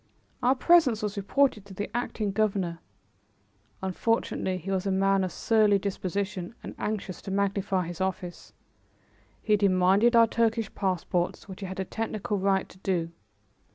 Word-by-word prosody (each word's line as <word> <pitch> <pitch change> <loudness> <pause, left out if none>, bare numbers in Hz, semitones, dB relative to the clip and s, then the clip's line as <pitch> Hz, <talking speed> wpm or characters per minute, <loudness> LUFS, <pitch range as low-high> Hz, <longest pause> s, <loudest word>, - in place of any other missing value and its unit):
Our 255 +2 +4
presence 270 -8 +4
was 210 0 -2
reported 215 +2 +1
to 195 -1 -12
the 205 +4 -5
acting 220 -4 -2
governor. 195 -5 0 1.0
Unfortunately 190 -1 0
he 185 +2 -5
was 190 0 -1
a - - +1
man 195 0 +2
of 185 - -2
surly 215 -3 +3
disposition 195 0 -3
and - - -7
anxious 205 -3 -3
to - - -8
magnify 195 -1 0
his 175 +1 -6
office. 180 -2 -4 0.9
He 215 - +3
demanded 200 +3 +4
our 230 0 +8
Turkish 225 -1 0
passports, 180 -2 -1
which 190 -2 -9
he 195 - -5
had 190 +1 -6
a 190 - -1
technical 215 0 -3
right 195 0 +1
to 185 - -17
do. 175 -4 -1
195 Hz, 155 wpm, -27 LUFS, 185-215 Hz, 1.0 s, our